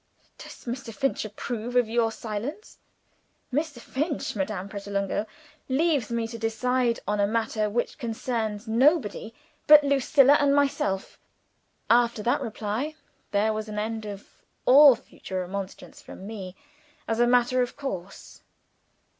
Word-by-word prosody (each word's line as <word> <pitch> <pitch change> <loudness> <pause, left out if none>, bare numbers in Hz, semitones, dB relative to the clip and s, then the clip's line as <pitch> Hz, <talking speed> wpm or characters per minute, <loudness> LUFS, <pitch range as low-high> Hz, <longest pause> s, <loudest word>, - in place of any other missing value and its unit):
"Does - - -12
Mr. 245 0 -5
Finch 270 0 -1
approve 230 +3 -5
of 245 -2 +4
your 225 0 +1
silence?" 225 - -6 0.7
"Mr. 295 -2 -1
Finch, 290 +3 -3
Madame 195 -1 -3
Pratolungo, 200 +1 -3 0.4
leaves 285 -3 +1
me 230 -1 -1
to 230 0 -8
decide 235 +2 0
on 210 0 0
a 200 - +3
matter 220 -1 0
which 240 +7 -2
concerns 225 -3 -3
nobody 230 - +2 0.4
but 300 0 +9
Lucilla 280 0 +5
and 280 -1 +3
myself." 275 -9 0 0.7
After 235 -2 +3
that 240 - +1
reply, 225 +7 -3 0.3
there 210 +2 +1
was 215 0 -4
an 210 - -6
end 220 0 -3
of 200 -1 -8 0.4
all 275 0 +8
further 190 -6 -7
remonstrance 195 +1 -7
from 190 - -11
me, 195 -4 -7 0.5
as 225 0 -1
a 240 - +4
matter 245 +1 +3
of 245 - -3
course. 195 -10 -7
230 Hz, 135 wpm, -26 LUFS, 210-260 Hz, 0.7 s, but